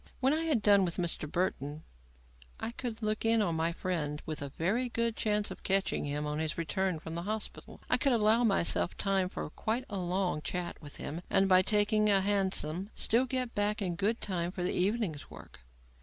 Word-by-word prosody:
When 265 +2 +3
I 320 +1 0
had 280 -10 +1
done 200 -2 +6
with 170 -2 -2
Mr. 165 -3 -2
Burton 155 -4 -2 0.8
I 225 - -3
could 235 -2 -6
look 215 0 -1
in 225 0 +4
on 175 -5 0
my 160 +1 0
friend 160 -4 -2
with 155 -2 -5
a 140 - -4
very 210 - -1
good 230 -1 0
chance 210 -1 0
of - - -9
catching 195 -5 +1
him 145 +1 -2
on 150 +1 -2
his 155 -1 -2
return 185 +1 -1
from 160 +1 -8
the 170 - -3
hospital. 215 +3 -5
I - - +3
could 275 - +2
allow 225 0 +4
myself 195 -5 +2
time 195 -2 +1
for - - -5
quite 230 +8 -2
a 200 - -2
long 180 -2 -1
chat 175 +2 -4
with 145 -2 -9
him, 160 +4 -5
and, 195 - +4
by 185 -1 +6
taking 210 +2 +3
a 200 -1 +5
hansom, 190 -2 0
still 240 +4 +3
get 255 -1 -2
back 205 +1 +1
in 180 -4 -2
good 205 +6 0
time 175 -3 -2
for 180 -1 -4
the 180 - 0
evening's 190 -5 -1
work. - - -13
195 Hz, 205 wpm, -31 LUFS, 170-215 Hz, 0.8 s, done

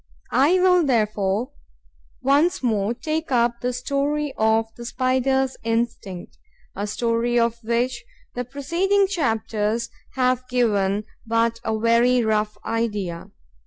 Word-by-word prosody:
I 290 +7 +4
will 360 -1 +4
therefore 215 -2 0 0.7
once 285 +5 +3
more 220 -1 +1
take 315 +3 -3
up 235 -1 +2
the 250 - 0
story 280 +3 -1
of 220 +1 +2
the 240 - -9
Spider's 260 +2 0
instinct, 225 -5 -3 0.4
a 205 +2 -3
story 230 +2 0
of 235 0 +1
which 235 +3 -1 0.3
the 245 - -3
preceding 335 +10 +1
chapters 225 - -1 0.3
have 255 -1 +1
given 210 -5 +1 0.2
but 230 0 +1
a 220 -1 -1
very 235 +2 +3
rough 215 -1 0
idea. 210 -7 -2
235 Hz, 120 wpm, -23 LUFS, 220-265 Hz, 0.7 s, I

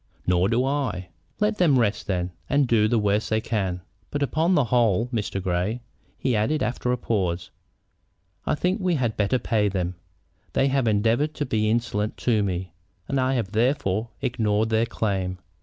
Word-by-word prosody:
"Nor 90 +1 +3
do 120 +2 +2
I." 130 -10 -2 0.3
"Let 210 +1 +1
them 155 -7 +5
rest, 115 -3 0
then, 90 -2 -1 0.2
and 140 -1 +3
do 110 -3 +4
the 115 - +2
worst 105 0 +1
they 110 - +2
can. 95 -6 -2 0.3
But 145 0 -1
upon 160 +7 +2
the 145 - +4
whole, 115 -3 +2
Mr. 105 -5 -2
Grey," 95 +6 -1 0.3
he 125 - 0
added, 110 +9 +1
after 125 0 -1
a 125 - +1
pause, 90 -7 -1 1.0
"I - - +2
think 185 +6 0
we 180 -2 +2
had 120 -6 0
better 105 +5 +2
pay 105 -4 +1
them. 90 -2 -2 0.6
They 135 - +3
have 135 -3 +1
endeavored 115 +8 +2
to 145 - -2
be 110 -4 +1
insolent 110 -2 -1
to 115 -4 +2
me, 90 -3 -2 0.3
and 140 - 0
I 130 +1 +1
have 110 -6 -2
therefore 115 -2 +1
ignored 110 -4 +1
their 115 +1 +2
claim. 95 -5 -2
115 Hz, 175 wpm, -25 LUFS, 100-130 Hz, 1.0 s, them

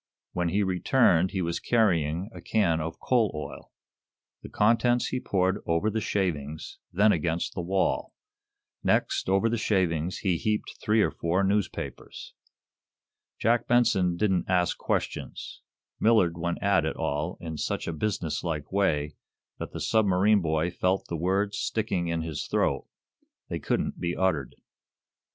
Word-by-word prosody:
When 90 -1 0
he 100 +4 +1
returned 95 -1 +3
he 95 -1 -2
was 85 0 -2
carrying 90 -4 +1
a - - -9
can 85 -8 +1
of 80 +1 -5
coal 115 -5 +2
oil. 75 - -7 0.7
The - - -9
contents 120 +3 +2
he 130 - -2
poured 95 -2 0
over 85 +6 +1
the 110 +1 -1
shavings, 80 -8 -3
then 105 +4 +4
against 85 0 -1
the 90 - -3
wall. 95 +2 0 0.7
Next, - - +1
over 95 +4 +3
the 115 0 0
shavings, 90 -5 0
he 90 -4 0
heaped 105 +4 -2
three 105 0 +3
or - - +1
four 85 +4 0
newspapers. 95 -8 -3 1.0
Jack 115 +2 +1
Benson 95 -8 +3
didn't 95 -3 +1
ask 90 -2 +2
questions. - - -4 0.4
Millard 105 -7 +4
went 85 +1 -3
at 100 -5 +3
it 80 - -2
all 80 +2 -2
in 80 -2 -6
such - - -2
a 85 - -2
business 85 -2 -2
like 75 -4 -3
way 75 -7 +1 0.5
that - - -5
the - - -6
submarine 100 -1 +3
boy 80 +1 0
felt 95 +3 0
the 85 - -2
words 95 +5 0
sticking 100 -6 -1
in 85 -1 -1
his 80 -2 -4
throat; - - 0 0.6
they - - -3
couldn't - - -1
be 85 0 -2
uttered. 80 -9 0
90 Hz, 150 wpm, -27 LUFS, 85-105 Hz, 1.0 s, then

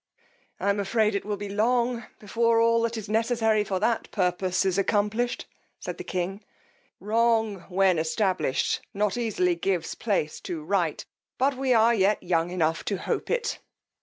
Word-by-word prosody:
I 200 - +2
am 200 - -1
afraid 210 +2 +1
it 200 - -2
will 205 -1 -2
be 205 +1 -5
long 235 +3 +1
before 230 +2 +1
all 230 0 +4
that 230 0 -1
is 215 - -6
necessary 225 0 +2
for 195 -2 -2
that 225 +3 0
purpose 185 -1 0
is 190 0 +1
accomplished, 210 +4 0 0.3
said - - -6
the - - -4
king; 190 - -3 0.6
wrong, 220 -2 +1
when 185 -2 +3
established, 180 - 0
not 205 0 +1
easily 215 -7 +1
gives 175 0 -1
place 195 -9 -1
to 165 -3 -5
right; 170 -2 -1 0.3
but 270 +1 +2
we 265 0 -1
are 225 +1 +5
yet 205 -1 +2
young 170 -1 +1
enough 165 -2 0
to 200 - -1
hope - - -3
it. 475 0 -1
205 Hz, 165 wpm, -26 LUFS, 185-230 Hz, 0.6 s, are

